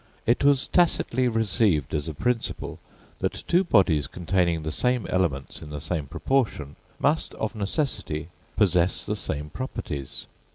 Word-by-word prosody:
It 120 +4 +2
was 140 -2 +4
tacitly 130 -7 +2
received 105 - +1
as 75 0 -1
a 80 - -6
principle, 125 - -2 0.4
that - - -2
two 180 +2 +4
bodies 90 - +3
containing 85 -1 0
the 80 - -2
same 125 +5 +1
elements 80 -8 -1
in 75 - -9
the 75 0 -5
same 80 -1 -2
proportion, 100 - -1 0.2
must 155 +3 +1
of 110 - -2
necessity 100 - -2 0.3
possess 90 -2 +3
the - - -1
same 75 +1 -4
properties. 75 - -5
95 Hz, 140 wpm, -26 LUFS, 75-125 Hz, 0.4 s, was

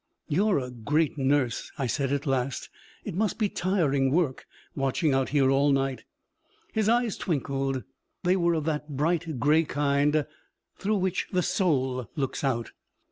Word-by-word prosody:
'You're 195 +6 +2
a 125 -2 -3
great 150 +6 0
nurse!' 135 -3 +1
I 135 - -1
said 135 +2 -1
at 140 +1 -1
last. 135 -2 -1 0.3
'It - - -5
must 210 +4 0
be 215 -3 +1
tiring 150 -10 +1
work, 150 -3 0 0.3
watching 135 +3 +1
out 135 -1 +1
here 135 -2 +3
all 140 +1 +3
night.' 135 -3 0 0.7
His 220 -1 +1
eyes 235 -2 +2
twinkled; 135 -4 -1 0.4
they 180 +1 +3
were 170 -2 +2
of 155 -2 -2
that 150 -1 -2
bright 160 -1 0
gray 150 +6 +4
kind 145 0 +1 0.5
through 210 +2 0
which 190 -1 -1
the 180 -1 +1
soul 130 - 0
looks 140 -2 -2
out. 120 -5 -1
145 Hz, 155 wpm, -27 LUFS, 135-170 Hz, 0.7 s, gray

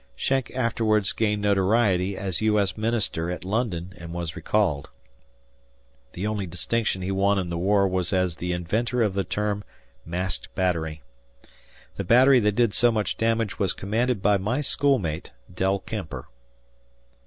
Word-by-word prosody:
Schenck 130 - 0
afterwards 110 -4 +1
gained 105 -2 0
notoriety 100 -1 +2
as 95 -3 -3
U. 110 -1 +3
S. 100 -2 0
Minister 110 -7 -1
at 90 0 -5
London 95 -4 -2
and 85 -1 -9
was 85 -1 -4
recalled. 90 -7 0 1.2
The 90 - -4
only 105 -3 -2
distinction 95 +3 -1
he 95 - -2
won 100 +1 +2
in 90 -2 -2
the 85 - -3
war 100 +2 +3
was 90 -2 -1
as 90 -3 0
the 90 0 -3
inventor 115 +8 0
of 105 -3 0
the 100 0 0
term 105 0 -2 0.4
"masked 90 +1 -3
battery." 80 -5 -1 0.9
The 100 - -2
battery 125 +6 +6
that 105 -2 +1
did 115 -3 +2
so 120 +1 +4
much 110 -2 -1
damage 115 -2 0
was 95 -4 +1
commanded 110 +1 -1
by 105 0 +4
my 110 +9 -1
schoolmate, 130 - 0 0.2
Del 95 +2 +1
Kemper. 90 - -6
100 Hz, 155 wpm, -25 LUFS, 90-110 Hz, 1.2 s, battery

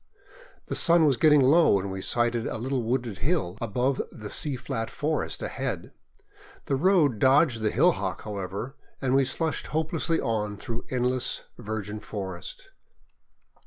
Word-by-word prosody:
The - - -5
sun 170 -2 +4
was 140 -3 +4
getting 150 0 +5
low 155 +3 +5
when 100 0 -1
we 95 0 -5
sighted 120 +2 +1
a - - -3
little 130 +3 -1
wooded 120 -3 -2
hill 130 - 0
above 125 +4 0
the 105 -2 -8
sea 145 -3 0
flat 120 -3 -4
forest 155 +1 -2
ahead. - - -4 0.7
The 140 - 0
road 150 - +3
dodged 130 -2 +4
the 110 - +2
hillock, 125 - +1
however, 100 +5 -5 0.2
and 130 -2 0
we 135 0 +4
slushed 160 +4 -1
hopelessly 160 +1 0
on 105 -2 -1
through 115 +2 -6
endless 125 0 0 0.2
virgin 110 -2 -4
forest. 95 -4 -7
125 Hz, 145 wpm, -27 LUFS, 105-145 Hz, 0.7 s, getting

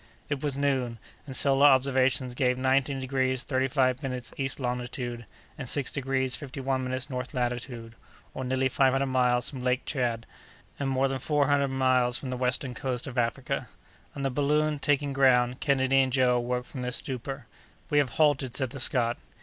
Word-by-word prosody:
It 145 -2 -2
was 145 -2 -1
noon; 130 -4 0 0.3
and 135 - -6
solar 140 +2 +5
observations 130 -1 +3
gave 125 0 +1
nineteen 135 +1 +1
degrees 130 0 -1
thirty 130 -1 0
five 130 -1 +1
minutes 125 -4 -4
east 135 -1 -3
longitude, 125 -2 -4 0.3
and 125 -4 -5
six 140 -2 0
degrees 135 -2 0
fifty 140 -1 -8
one 135 -1 -1
minutes 130 +1 -3
north 125 -2 -5
latitude, 120 -2 -3 0.4
or 130 - -5
nearly 130 +1 +1
five 130 0 +3
hundred 135 +1 +1
miles 125 -1 +2
from 135 - -7
Lake 125 0 0
Tchad, 120 -4 -1 0.6
and 140 -1 -1
more 135 0 +2
than 135 0 -3
four 145 +1 +1
hundred 140 -1 +3
miles 130 -2 +2
from 130 0 -5
the - - -2
western 125 +1 -1
coast 125 0 -3
of 130 -1 -3
Africa. 120 +2 -2 0.5
On 140 - -4
the 135 - 0
balloon 150 +2 +1
taking 145 -1 +1
ground, 125 -2 +3
Kennedy 135 -1 +2
and 130 -1 0
Joe 125 -1 +3
awoke 125 +1 -2
from 130 - -8
their 125 - -2
stupor. 135 +2 -4 0.5
"We 145 - +4
have 140 -3 +2
halted," 140 -5 +2
said 130 -2 -1
the 140 - -7
Scot. 120 -2 +2
130 Hz, 185 wpm, -28 LUFS, 125-135 Hz, 0.6 s, solar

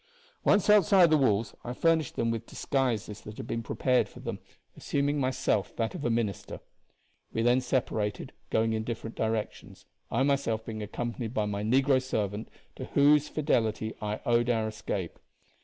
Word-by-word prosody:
Once 205 - +3
outside 195 -4 +6
the - - +6
walls, 110 -6 +1
I 120 - -4
furnished 165 +3 +1
them 115 0 0
with 115 0 -4
disguises 115 -6 -2
that 105 0 -10
had - - -6
been 115 - -3
prepared 125 +2 +1
for - - -13
them, - - -5 0.4
assuming 145 +1 -1
myself 130 -7 0
that 115 -3 -1
of - - -6
a 120 - +1
minister. 115 -5 -2 0.7
We 115 - -1
then 120 +2 +4
separated, 110 -5 -2 0.2
going 110 0 +1
in 110 0 -1
different 115 0 -5
directions, 110 -1 -3 0.2
I 135 - +1
myself 135 -6 0
being 110 -2 -5
accompanied 120 +2 -4
by 105 - +1
my 100 -1 -3
negro 130 +4 +3
servant, 105 -4 -3 0.3
to - - -5
whose 150 +1 +4
fidelity 110 -7 0
I 105 0 -3
owed 120 -1 +2
our 110 -2 +1
escape. 105 -4 -4
115 Hz, 165 wpm, -29 LUFS, 110-135 Hz, 0.7 s, outside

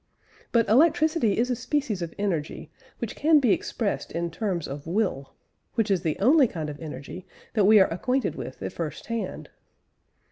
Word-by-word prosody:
But 230 -2 +3
electricity 310 - +3
is 245 +3 +1
a - - +1
species 250 -7 -2
of 170 -1 -5
energy 170 -7 -3 0.3
which 235 - -5
can 310 +1 +4
be 250 -6 +3
expressed 215 -4 -2
in 170 0 -3
terms 180 -3 -2
of 140 +2 -7
will 170 -8 -1 0.4
which 225 -3 +1
is 185 -3 +2
the 160 -3 -1
only 270 +5 +5
kind 155 -7 -5
of 145 - -10
energy 160 +3 -8 0.3
that 210 -4 +3
we 215 +1 +7
are 190 - +7
acquainted 250 +9 0
with - - -8
at - - -4
first - - -5
hand. 230 -1 -5
210 Hz, 175 wpm, -26 LUFS, 170-250 Hz, 0.4 s, we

